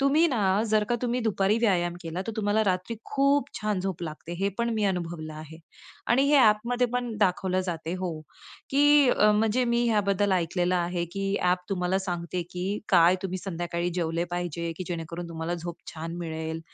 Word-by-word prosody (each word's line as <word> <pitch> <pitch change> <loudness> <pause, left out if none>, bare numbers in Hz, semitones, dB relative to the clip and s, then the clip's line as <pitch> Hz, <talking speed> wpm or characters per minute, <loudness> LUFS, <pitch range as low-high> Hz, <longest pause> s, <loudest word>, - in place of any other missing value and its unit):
तुम्ही 290 +5 +4
ना 205 -5 +2
जर 215 0 +3
का 240 - -1
तुम्ही 245 0 0
दुपारी 210 -1 +2
व्यायाम 180 -6 +1
केला, 170 +2 -4
तर 225 - -3
तुम्हाला 215 +1 +2
रात्री 185 +4 -1
खूप 280 0 +2
छान 210 -3 -1
झोप 185 -2 -3
लागते 160 +1 -6
हे 195 +1 +1
पण 235 0 +1
मी 215 - 0
अनुभवलं 170 -4 -2
आहे. 155 +1 -10 0.5
आणि 250 +3 +4
हे 295 - +5
ॲपमध्ये 240 +1 +4
पण 245 -2 -1
दाखवलं 185 -1 +1
जाते 165 -1 -3
हो. 185 -2 -1 0.6
की 290 0 +5
अ, 210 0 +5
म्हणजे 220 +4 +2
मी 235 0 +1
ह्याबद्दल 205 -2 +2
ऐकलेलं 180 0 +1
आहे 175 0 -1
की 195 0 -1
ॲप 180 0 +3
तुम्हाला 185 0 0
सांगते, 175 -1 -3
की 190 +3 -3
काय 175 0 +5
तुम्ही 185 -1 -3
संध्याकाळी 175 -1 -3
जेवले 170 -1 -1
पाहिजे, 170 -1 -3
की 185 - -4
जेणेकरून 170 0 -5
तुम्हाला 165 +1 -3
झोप 170 0 -6 0.2
छान 165 +1 -5
मिळेल. 160 -1 -4
185 Hz, 180 wpm, -27 LUFS, 170-215 Hz, 0.6 s, हे